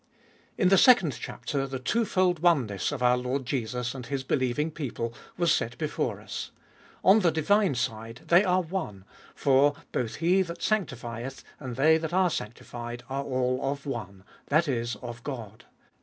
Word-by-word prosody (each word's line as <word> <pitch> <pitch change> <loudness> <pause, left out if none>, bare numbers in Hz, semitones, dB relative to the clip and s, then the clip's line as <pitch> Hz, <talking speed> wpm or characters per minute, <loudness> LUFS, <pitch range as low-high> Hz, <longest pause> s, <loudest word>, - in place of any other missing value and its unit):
IN 185 - +4
the 195 -1 +6
second 190 - +6
chapter 135 +3 -3
the 135 0 -4
twofold 185 - +1
oneness 135 - +2
of 140 -4 -3
our 125 0 +5
Lord 125 +2 -2
Jesus 120 -1 -2
and 130 -3 -8
His 135 -2 -2
believing 130 +3 0
people 120 -6 -4 0.2
was 175 -1 +3
set 120 +2 -1
before 155 +1 -2
us. - - -6 0.5
On 195 +4 +7
the 180 -5 +3
divine 170 +2 +2
side 115 -1 -3
they 175 +3 +5
are 185 -1 +2
one, 155 - -5 0.3
for 140 +1 +4 0.2
both 115 -3 -2
He 175 +4 +3
that 170 -2 -5
sanctifieth, 130 - -2 0.2
and 130 -4 -6
they 160 +5 +4
that 160 +1 -4
are 185 -1 +3
sanctified 120 +1 -6
are 135 +1 -1
all 130 -1 0
of 140 +1 -3
one, 100 -8 -6 0.2
that 155 +3 +3
is, 120 -3 -1
of 120 -1 -7
God. 115 -7 -7
135 Hz, 165 wpm, -27 LUFS, 120-170 Hz, 0.5 s, On